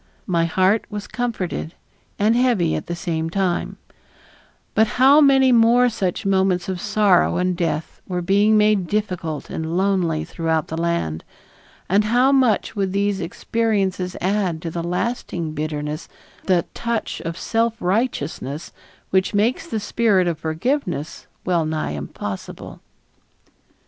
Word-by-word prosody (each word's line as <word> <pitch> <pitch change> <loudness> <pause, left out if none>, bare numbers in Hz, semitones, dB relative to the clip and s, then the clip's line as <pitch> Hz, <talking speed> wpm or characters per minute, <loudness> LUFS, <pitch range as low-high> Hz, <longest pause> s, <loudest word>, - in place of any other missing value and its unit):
My 170 -2 +1
heart 190 +6 +2
was 210 -1 -5
comforted 205 -9 -3 0.4
and 215 +3 +3
heavy 235 -10 +2
at - - -3
the 175 - -3
same 165 -1 -2
time; 185 -1 -1 1.0
but 220 +1 +4
how 275 +4 +7
many 270 -2 +5
more 240 +1 +5
such 195 -3 -2
moments 190 -2 +2
of 185 -2 -3
sorrow 205 -5 +3
and 180 0 0
death 165 -3 -3
were 180 -1 -2
being 205 +4 +4
made 210 -4 +3
difficult 180 -7 -3
and 160 +2 -3
lonely 180 -5 +1
throughout 160 -2 -1
the 160 - -3
land, 165 - -1 0.6
and 200 +3 +3
how 245 +5 +3
much 255 -6 +2
would 195 -2 -1
these 200 0 0
experiences 190 0 -1
add 185 -3 0
to 165 - -3
the 170 - -3
lasting 175 -2 -3
bitterness, 150 0 -4 0.4
that 180 -3 +1
touch 235 -2 -3
of 165 0 -5
self 230 +3 0
righteousness 175 - -2 0.4
which 190 +2 +1
makes 230 +10 +1
the 225 - -2
spirit 205 -3 +2
of 165 -3 -2
forgiveness 160 - -2 0.2
well 175 -3 +2
nigh 155 - -2
impossible. 75 +7 -7
185 Hz, 135 wpm, -21 LUFS, 165-215 Hz, 1.0 s, how